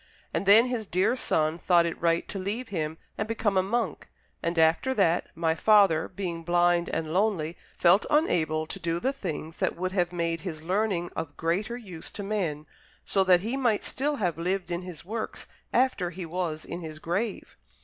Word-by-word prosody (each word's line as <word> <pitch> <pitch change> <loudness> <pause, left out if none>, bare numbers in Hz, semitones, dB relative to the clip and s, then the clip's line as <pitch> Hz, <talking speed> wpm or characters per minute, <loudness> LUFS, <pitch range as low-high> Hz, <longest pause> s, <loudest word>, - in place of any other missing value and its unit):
And 195 - -1
then 220 +4 +8
his 240 -4 -3
dear 185 +7 +2
son 160 -8 0
thought 175 -2 +4
it 170 - -4
right 170 0 +2
to 195 - -5
leave 210 +6 -3
him 160 -4 -3 0.2
and 210 - -1
become 220 -3 0
a 185 - +5
monk; 230 +6 -2 0.3
and 170 +1 -2
after 165 +11 +3
that, 175 -5 +2
my 165 -1 +1
father, 195 -3 +4
being 180 -3 -4
blind 175 0 +2
and 160 -1 -2
lonely, 180 -5 +1 0.2
felt 180 +4 +4
unable 160 - +2
to - - -6
do 170 0 -1
the 265 +8 0
things 165 - -5
that - - 0
would 185 +1 -2
have 180 -2 +1
made 170 -2 -1
his 160 -5 -6
learning 185 -1 0
of 145 -3 -5
greater 195 +9 -1
use 185 -9 -7
to 205 - -5
men, 180 -8 -2 0.4
so 195 - +2
that 180 -2 +5
he 225 +6 -2
might 240 -6 +1
still 290 +3 -1
have 180 - -1
lived 180 +1 -1
in 175 +1 -1
his 175 -6 -9
works 220 +3 -4 0.3
after 245 -8 +2
he 180 +1 -6
was 165 -2 -3
in 175 - -6
his 155 -2 -7
grave." 190 +7 -3
180 Hz, 190 wpm, -27 LUFS, 165-205 Hz, 0.4 s, then